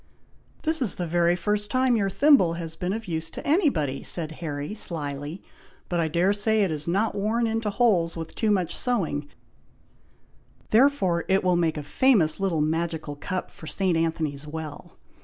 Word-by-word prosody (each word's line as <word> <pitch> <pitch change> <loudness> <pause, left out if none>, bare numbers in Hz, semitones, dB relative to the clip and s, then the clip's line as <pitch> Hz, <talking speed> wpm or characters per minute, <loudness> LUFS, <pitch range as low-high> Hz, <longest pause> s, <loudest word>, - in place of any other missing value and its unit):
"This 320 -1 +1
is 230 -7 +1
the 180 - -3
very 170 +1 +2
first 210 +2 -1
time 255 +1 +2
your 200 -3 +1
thimble 255 - +4
has 165 -1 -5
been 180 +2 -3
of 220 +1 -4
use 165 -1 -3
to - - -8
anybody!" 230 - +1
said 160 -3 -3
Harry, 145 +1 -4
slyly; 150 -4 -4 0.5
"but 175 - 0
I 165 - +1
dare 175 +5 +2
say 215 +1 +2
it 190 - 0
is 150 0 -4
not 200 +6 +1
worn 215 +4 0
into 225 -1 -1
holes 200 -6 +2
with 160 0 -6
too 220 - 0
much 185 -5 +1
sewing, 160 - -1 1.4
therefore 215 -9 +3
it 190 0 +2
will 180 -1 +3
make 165 -2 +1
a 150 - -4
famous 195 - +3
little 185 -5 0
magical 160 -1 -2
cup 185 +5 -4
for 160 - -12
St. 185 0 0
Anthony's 155 -3 -1
Well. 155 -1 -8
175 Hz, 175 wpm, -25 LUFS, 160-210 Hz, 1.4 s, thimble